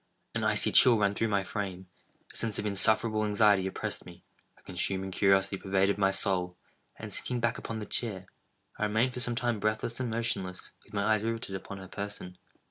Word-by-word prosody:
An - - -2
icy - - +4
chill 120 -3 +7
ran 100 -1 +2
through 115 +2 0
my 100 -2 +1
frame; 95 -2 -4 0.5
a - - -18
sense 110 -3 -2
of 105 - -2
insufferable 110 +2 +2
anxiety 105 -2 +4
oppressed 95 - -4
me; - - -13 0.3
a - - -24
consuming 95 +1 -2
curiosity 95 0 +3
pervaded 95 +1 +1
my 95 -1 +4
soul; 95 -2 0 0.4
and - - -8
sinking 125 -1 -1
back 120 0 0
upon 115 - -5
the 105 - -5
chair, 100 -3 -2 0.5
I 105 - +2
remained 110 +5 +1
for 125 - -5
some 120 0 +1
time 120 -2 0
breathless 110 +3 -1
and 125 -2 -1
motionless, 110 -5 -2
with - - -21
my 100 - +1
eyes 110 0 +2
riveted 115 -3 -3
upon 100 +1 -7
her 95 -1 -9
person. 100 -2 -6
105 Hz, 195 wpm, -30 LUFS, 95-115 Hz, 0.5 s, chill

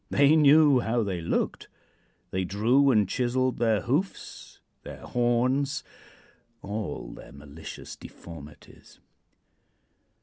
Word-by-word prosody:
They 140 +2 +4
knew 150 -2 +6
how 120 0 0
they 95 -4 -3
looked. 80 - -2 0.6
They 95 0 -1
drew 115 +9 +2
and 105 -6 +3
chiseled 125 +3 -1
their 110 -3 +2
hoofs, 150 +11 -4 0.2
their - - -10
horns 130 +4 0 0.8
all 105 0 -5
their - - -12
malicious 70 +3 -10
deformities. 75 -3 -13
120 Hz, 100 wpm, -27 LUFS, 100-140 Hz, 0.8 s, knew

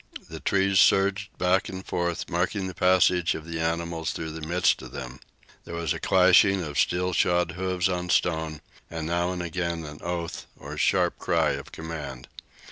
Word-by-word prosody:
The - - -6
trees 95 -1 +2
surged 100 0 +3
back 90 +1 +2
and 95 0 -7
forth, 85 -1 -2
marking 90 +3 -1
the 95 - -5
passage 90 -1 +3
of 80 - -7
the 85 -1 -5
animals 85 0 -2
through 80 -1 -4
the 80 +1 -8
midst 90 +2 +2
of 65 -1 -10
them. 65 -1 -7 0.4
There 85 - -7
was 85 -2 -1
a - - -6
clashing 95 +1 +5
of 75 -2 -3
steel 90 +1 +1
shod 85 -1 +2
hoofs 90 +1 -1
on 90 -1 -3
stone, 80 -3 0 0.3
and 80 -1 -5
now 85 +2 0
and 90 -1 -3
again 85 -1 -3
a 85 +3 -6
sharp - - +2
cry - - +2
of - - -6
command. 75 -6 -7
85 Hz, 170 wpm, -26 LUFS, 80-90 Hz, 0.4 s, clashing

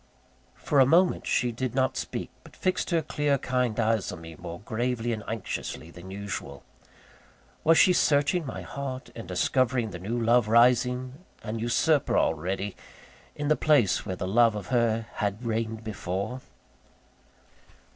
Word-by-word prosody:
For 145 - +1
a 135 - +8
moment 175 +5 +3
she 125 -2 +1
did 125 +1 -4
not 130 0 +1
speak; - - -4
but - - -16
fixed 185 -1 -1
her 165 -2 +1
clear, 145 -1 0
kind 125 -3 -1
eyes 110 -2 +1
on 80 - -8
me 80 0 -10
more 85 +2 -8
gravely 120 +2 -2
and 110 -1 -5
anxiously 100 -6 -5
than 90 +2 -11
usual. 100 -7 -6 1.0
Was 165 +1 +5
she 185 - +6
searching 145 +3 +2
my 135 - -6
heart, 135 -2 -6
and 115 - -8
discovering 115 +5 +1
the 90 - -7
new 110 +7 -3
love 115 0 +3
rising, 125 +5 +3 0.2
an 115 0 -4
usurper 135 +6 +2
already, 95 +5 -1 0.6
in 145 0 -3
the 155 - +4
place 145 -12 +3
where 95 -3 -4
the 90 - -4
love 115 +2 +4
of 100 -3 -6
her 115 -2 +1
had 105 +3 -2
reigned 115 0 -2
before? 105 +3 -4
115 Hz, 155 wpm, -27 LUFS, 105-130 Hz, 1.0 s, a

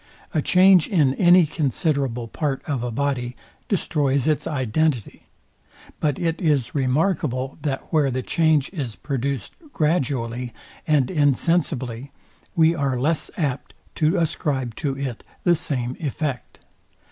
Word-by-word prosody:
A 155 - +2
change 185 +1 +5
in 150 -9 +3
any 175 +3 +6
considerable 140 -5 -1
part 140 +2 -2
of 140 -5 -2
a 120 - -2
body 125 -1 -2 0.3
destroys 145 - +1
its 155 -1 +1
identity; 130 -2 -1 0.7
but 145 -3 0
it 165 +1 -1
is 150 -8 +1
remarkable, 135 -1 0
that 135 -3 -2
where 150 -3 +3
the 130 0 -2
change 155 -2 +2
is 130 - -4
produced 135 -2 -3 0.2
gradually 125 -6 -1 0.3
and 150 -3 +2
insensibly 140 -4 0 0.4
we 165 -1 +5
are 140 -5 -1
less 155 +5 0
apt 140 -6 -2 0.2
to 160 +4 +1
ascribe 140 -7 -1
to 140 -4 -2
it 135 -4 -4 0.2
the 175 - +4
same 130 -5 -2
effect. 145 -3 -4
140 Hz, 125 wpm, -23 LUFS, 130-160 Hz, 0.7 s, any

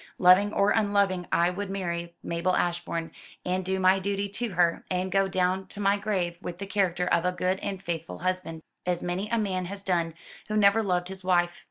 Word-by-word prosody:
Loving 185 +3 +6
or 200 -1 +3
unloving 200 -4 +1
I 170 +1 +3
would 200 +2 -4
marry 170 -3 -3
Mabel 170 +2 0
Ashbourne, 170 -1 -1 0.3
and 185 +1 0
do 190 +1 -1
my 190 +1 +4
duty 200 +1 -2
to 225 +1 -4
her, 170 -1 +2
and 185 0 -1
go 195 0 +3
down 185 0 0
to 205 - -8
my 200 0 +3
grave 185 -5 -2
with 175 - -6
the 200 - -5
character 190 -3 0
of 170 -2 +2
a 180 - +2
good 180 +1 -1
and 195 -2 -4
faithful 170 -3 -5
husband, 180 -2 -3 0.2
as 180 -1 -1
many 180 +4 -2
a 230 - +1
man 190 -4 -1
has 200 +2 -6
done 170 -4 0 0.3
who 215 0 -1
never 205 +1 +5
loved 180 -3 0
his 190 -1 -8
wife. 175 -1 +1
185 Hz, 205 wpm, -27 LUFS, 175-200 Hz, 0.3 s, Loving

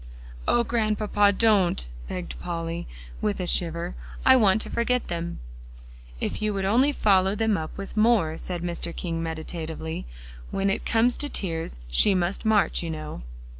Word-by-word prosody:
"Oh, 240 - +4
Grandpapa, 215 -3 +2
don't!" 200 - +3 0.2
begged 180 -1 -5
Polly, 170 -1 -4 0.3
with 105 - 0
a 180 - -1
shiver; 170 0 0 0.3
"I 260 - +8
want 215 -4 +4
to - - -8
forget 250 +1 0
them." 170 0 -3 0.8
"If - - -3
you 215 -1 0
would 195 -1 -1
only 250 +8 +4
follow 195 -6 +3
them 220 0 +2
up 160 -4 -5
with 195 0 -7
more," 215 -8 +3
said 175 -2 -4
Mr. 170 -1 -3
King 165 -2 -3
meditatively; 160 - -5 0.4
"when 195 0 0
it - - -2
comes 235 +2 +3
to 290 - -1
tears, 165 - -3
she - - +4
must 185 +4 -1
march, 215 -2 +3
you 170 - -4
know." 155 - -6
190 Hz, 160 wpm, -26 LUFS, 165-215 Hz, 0.8 s, I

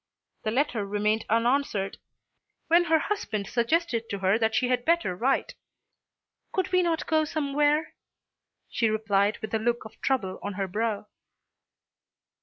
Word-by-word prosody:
The - - 0
letter 240 -2 0
remained 210 +2 0
unanswered, 230 -3 +1 0.7
when 345 +1 +5
her 325 -1 +4
husband 300 - -2
suggested 235 - 0
to 200 - -2
her 195 +3 +2
that 220 -1 +1
she 255 - +2
had 250 -1 +1
better 335 - +1
write. 260 +8 0 1.0
"Could 375 -1 -1
we 365 0 +4
not 335 -3 0
go 315 -1 +2
somewhere?" 295 +1 +1 0.7
she 230 - +1
replied 210 -1 +1
with 220 - -5
a 220 - +2
look 235 +1 -1
of 220 - -13
trouble 220 -9 -1
on 205 - -4
her 195 0 -2
brow. 215 +2 -2
230 Hz, 145 wpm, -27 LUFS, 210-300 Hz, 1.0 s, when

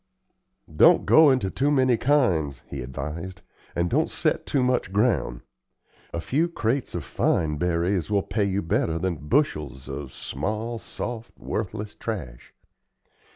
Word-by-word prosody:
"Don't 170 +1 +6
go 155 -1 +7
into 125 -8 +1
too 140 +2 +1
many 130 -4 +4
kinds," 95 - +1
he 70 - -6
advised, 75 +8 -6 0.3
"and 85 +1 +1
don't - - +1
set - - -1
too 135 -3 +1
much 125 -7 +1
ground. 100 - +1 0.7
A 85 - -3
few 140 - +1
crates 125 - -1
of 85 - -3
fine 75 +3 0
berries 85 +1 0
will 100 -2 +2
pay 105 +1 0
you 100 +1 -1
better 80 0 0
than 85 0 -1
bushels 75 - 0
of 70 -1 -6
small, 110 - -4
soft, 115 0 -6
worthless 105 0 -4
trash. 85 - -6
95 Hz, 140 wpm, -25 LUFS, 80-120 Hz, 0.7 s, go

